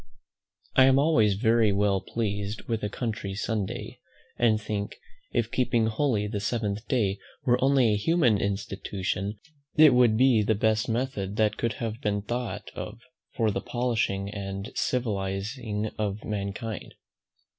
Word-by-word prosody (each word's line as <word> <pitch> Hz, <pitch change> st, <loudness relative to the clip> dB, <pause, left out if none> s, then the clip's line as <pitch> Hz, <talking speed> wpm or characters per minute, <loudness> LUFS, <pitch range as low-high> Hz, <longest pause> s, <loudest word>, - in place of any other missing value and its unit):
I 130 Hz, -, +7 dB
am 135 Hz, 0 st, +5 dB
always 125 Hz, -9 st, +4 dB
very 110 Hz, 0 st, +3 dB
well 100 Hz, -1 st, +2 dB
pleased 105 Hz, -2 st, -3 dB
with 115 Hz, -2 st, -2 dB
a 105 Hz, -, -2 dB
country 105 Hz, -3 st, -4 dB
Sunday, 105 Hz, -2 st, -3 dB, 0.4 s
and 110 Hz, -3 st, +3 dB
think, 105 Hz, -1 st, -4 dB, 0.4 s
if -, -, 0 dB
keeping 120 Hz, -3 st, +2 dB
holy 110 Hz, -1 st, +1 dB
the 105 Hz, 0 st, -3 dB
seventh 105 Hz, 0 st, -2 dB
day 100 Hz, -6 st, +1 dB, 0.3 s
were 125 Hz, 0 st, +3 dB
only 135 Hz, -5 st, +4 dB
a -, -, +1 dB
human 120 Hz, -, +3 dB
institution, 100 Hz, 0 st, -3 dB, 0.4 s
it 155 Hz, -3 st, +8 dB
would 120 Hz, -3 st, +5 dB
be 125 Hz, -3 st, +5 dB
the 105 Hz, +1 st, +2 dB
best 110 Hz, +1 st, +1 dB
method 110 Hz, -5 st, -2 dB
that 110 Hz, -1 st, +2 dB
could 115 Hz, -1 st, -1 dB
have 115 Hz, +1 st, -4 dB
been 100 Hz, -1 st, -1 dB
thought 120 Hz, +2 st, -4 dB
of 110 Hz, +2 st, -7 dB, 0.4 s
for 110 Hz, -3 st, +2 dB
the -, -, -2 dB
polishing 115 Hz, -5 st, -1 dB
and 100 Hz, 0 st, -5 dB
civilizing 105 Hz, 0 st, -2 dB
of 105 Hz, -1 st, -2 dB
mankind. 105 Hz, +1 st, -4 dB
110 Hz, 145 wpm, -27 LUFS, 100-120 Hz, 0.4 s, it